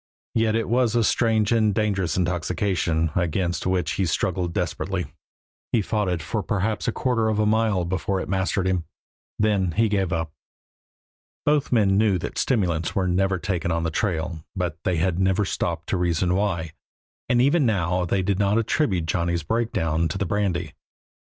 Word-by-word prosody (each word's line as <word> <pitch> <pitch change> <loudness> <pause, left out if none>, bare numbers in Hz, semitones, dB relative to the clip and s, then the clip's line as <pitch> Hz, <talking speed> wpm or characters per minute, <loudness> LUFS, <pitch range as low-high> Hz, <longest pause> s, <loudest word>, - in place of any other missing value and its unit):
Yet 110 -1 +2
it 115 - 0
was 120 -1 +2
a 120 - +3
strange 110 -1 +2
and 110 -3 +3
dangerous 100 -5 0
intoxication, 90 -2 0
against 90 0 0
which 90 -4 0
he 95 +4 0
struggled 85 +2 -1
desperately. - - -3 0.6
He 110 - +2
fought 105 -2 0
it 85 -3 -2
for 105 +6 -2
perhaps 105 +4 -1
a - - +2
quarter 115 -2 0
of 110 - 0
a 105 - +2
mile 105 -4 +2
before 95 +2 -1
it - - -4
mastered 95 0 0
him; 90 -3 0 0.5
then 100 -5 +1
he 110 +3 +2
gave 95 -3 0
up. 80 -3 -2 1.1
Both 145 -1 +2
men 100 -5 +3
knew 105 -4 +3
that - - -4
stimulants 85 - 0
are 95 -2 +1
never 95 +1 +1
taken 85 -2 -2
on 80 0 0
the 80 - -1
trail, 85 -3 -2
but 90 -4 -2
they 90 - +1
had 85 +2 0
never 95 +2 +2
stopped - - -2
to - - +1
reason 90 0 +1
why, 90 -5 -1 0.6
and 120 - +3
even 140 +5 +4
now 90 -4 +1
they 95 +2 0
did 95 +1 0
not 100 +1 +2
attribute 105 - +1
Johnny's 85 0 -1
breakdown 80 -5 0
to 95 - -4
the 100 - -1
brandy. 90 -4 -1
95 Hz, 175 wpm, -24 LUFS, 85-105 Hz, 1.1 s, even